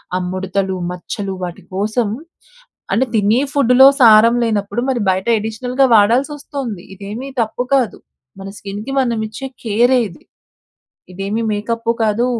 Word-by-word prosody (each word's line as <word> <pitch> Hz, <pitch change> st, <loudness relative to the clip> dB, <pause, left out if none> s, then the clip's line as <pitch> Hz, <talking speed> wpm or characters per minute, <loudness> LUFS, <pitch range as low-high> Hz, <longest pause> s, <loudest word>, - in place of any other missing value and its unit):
ఆ -, -, +1 dB
ముడతలు, 190 Hz, 0 st, -2 dB, 0.2 s
మచ్చలు, 195 Hz, +2 st, -5 dB
వాటి 175 Hz, -1 st, -9 dB
కోసం 215 Hz, +2 st, 0 dB, 0.8 s
అంటే, 260 Hz, -, +2 dB
తినే 215 Hz, +4 st, +3 dB
ఫుడ్డులో 265 Hz, -2 st, +5 dB, 0.2 s
సారం 225 Hz, 0 st, +7 dB
లేనప్పుడు, 205 Hz, 0 st, -1 dB
మరి 245 Hz, -3 st, -1 dB
బయట 190 Hz, +3 st, -3 dB
ఎడిషనల్‌గా 245 Hz, +5 st, 0 dB
వాడాల్సొస్తొంది. 250 Hz, -, 0 dB
ఇదేమీ 210 Hz, +7 st, -7 dB
తప్పు 225 Hz, +2 st, -2 dB
కాదు. 255 Hz, -5 st, 0 dB, 0.4 s
మన 195 Hz, -, -7 dB
స్కిన్‍కి 205 Hz, +5 st, -6 dB
మనమిచ్చే 230 Hz, 0 st, -3 dB, 0.2 s
కేరే 240 Hz, +3 st, +3 dB
ఇది. 170 Hz, -, -16 dB, 0.9 s
ఇదేమి 200 Hz, +4 st, -3 dB
మేకప్పు 230 Hz, +2 st, -1 dB
కాదు, 220 Hz, +2 st, +1 dB
220 Hz, 120 wpm, -17 LUFS, 200-245 Hz, 0.9 s, సారం